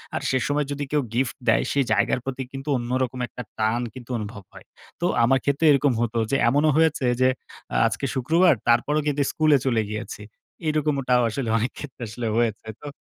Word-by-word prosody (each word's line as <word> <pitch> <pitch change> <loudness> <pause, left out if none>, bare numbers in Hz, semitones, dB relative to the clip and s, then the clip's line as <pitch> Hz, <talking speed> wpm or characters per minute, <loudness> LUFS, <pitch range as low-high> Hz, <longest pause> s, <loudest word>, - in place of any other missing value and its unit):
আর - - -2
সে 130 - +2
সময় 145 0 0
যদি 145 0 -3
কেউ 150 -1 +2
গিফট 125 0 -1
দেয় 115 - +4
সেই 140 - +2
জায়গার 110 +3 +2
প্রতি 130 0 -3
কিন্তু 135 +2 -6
অন্যরকম 125 +1 -2
একটা 125 - -8 0.2
টান 110 +3 +1
কিন্তু 130 -1 -10
অনুভব 105 -1 -7
হয়। - - -13 0.4
তো - - +1 0.2
আমার 135 +2 +4
ক্ষেত্রেও 140 +3 +3
এরকম 140 -2 +3
হত। 120 -2 -1 0.2
যে 135 - +3
এমনও 150 +4 +3
হয়েছে 160 -4 +2 0.2
যে 130 - +6 0.6
আজকে - - -3
শুক্রবার 165 +6 +4
তারপরও 140 +6 +3
কিন্তু 145 0 0
স্কুলে 155 -2 +4
চলে 120 -4 +2
গিয়েছি। 105 0 -6 0.5
এরকমটাও 140 -5 +1
আসলে 120 0 -3
অনেক 120 +4 -1
ক্ষেত্রে 135 -4 -8
আসলে 115 +2 -4
হয়েছে। 110 -2 0
তো 145 - -8
130 Hz, 185 wpm, -24 LUFS, 120-145 Hz, 0.6 s, যে